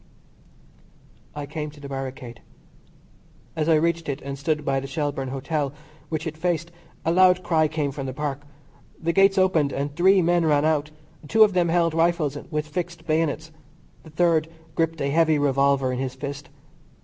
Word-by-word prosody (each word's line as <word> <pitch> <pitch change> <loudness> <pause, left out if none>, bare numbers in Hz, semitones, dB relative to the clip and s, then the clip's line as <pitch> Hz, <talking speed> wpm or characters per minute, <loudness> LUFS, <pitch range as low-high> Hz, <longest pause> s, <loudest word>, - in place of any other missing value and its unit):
I 145 -1 -4
came 150 +1 -5
to 150 0 -15
the 140 - -8
barricade. 130 -3 -6 1.1
As 155 +1 0
I 160 - +6
reached 165 0 0
it 140 0 -2
and 140 0 -5
stood 150 +1 -2
by 135 0 +1
the 135 - -6
Shelbourne 145 -2 -2
Hotel, 140 +2 -2 0.4
which 155 0 -3
it 160 -1 -4
faced, 170 0 -1 0.3
a 165 - +2
loud 185 +1 +5
cry 160 -3 +2
came 150 -2 -2
from 135 0 -5
the 130 - -4
Park. 145 0 -3 0.6
The 170 +1 -1
gates 195 +2 +4
opened 170 -7 +3
and 140 +1 -3
three 190 +2 +5
men 175 0 +2
ran 150 -2 +3
out. 150 -2 +1 0.4
Two 220 +8 +6
of 210 -2 +3
them 175 -2 +2
held 170 -1 +2
rifles 165 -3 +1
with 150 -1 -2
fixed 170 +1 -5
bayonets. 160 0 -1 0.5
The 160 - -14
third 160 -1 +2 0.3
gripped 165 -1 -1
a 140 0 0
heavy 160 0 +3
revolver 140 -2 +2
in 125 - -3
his 130 -1 -3
fist. 140 0 -6
155 Hz, 175 wpm, -24 LUFS, 140-170 Hz, 1.1 s, I